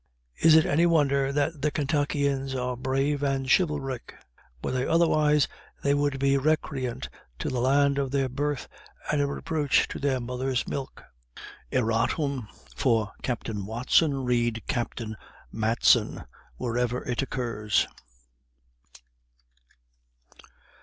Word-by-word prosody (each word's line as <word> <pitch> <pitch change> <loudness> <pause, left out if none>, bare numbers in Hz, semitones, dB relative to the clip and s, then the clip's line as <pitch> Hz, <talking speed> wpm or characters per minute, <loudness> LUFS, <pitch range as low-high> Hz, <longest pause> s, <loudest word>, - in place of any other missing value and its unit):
Is 160 -1 +6
it 160 - +6
any 165 +4 +3
wonder 140 -4 +2
that 145 +1 -1
the 150 - +2
Kentuckians 140 -2 0
are 125 -1 -2
brave 135 +3 0
and 135 -2 0
chivalric? 140 -6 0 0.5
Were - - -1
they 130 0 0
otherwise, 155 -3 +3 0.4
they 140 - +3
would 145 -1 +1
be 140 0 +2
recreant 135 -4 -1 0.3
to - - -3
the 125 - -2
land 140 +2 +3
of 135 -1 -1
their 135 0 +1
birth, 145 +2 -2 0.4
and 150 -1 +2
a 140 - +1
reproach 145 0 +1
to - - -6
their 135 -2 0
mothers' 125 +1 -2
milk." 135 -1 -5 0.7
Erratum. 120 +2 0 0.3
For 115 -5 +1
Captain 110 -5 -3
Watson, 130 +5 +2
read 120 -2 0
Captain 115 -4 -3 0.4
Matson, 110 +1 +2 0.3
wherever 125 - -1
it 125 0 0
occurs. 115 -6 0
135 Hz, 120 wpm, -27 LUFS, 125-145 Hz, 0.7 s, Is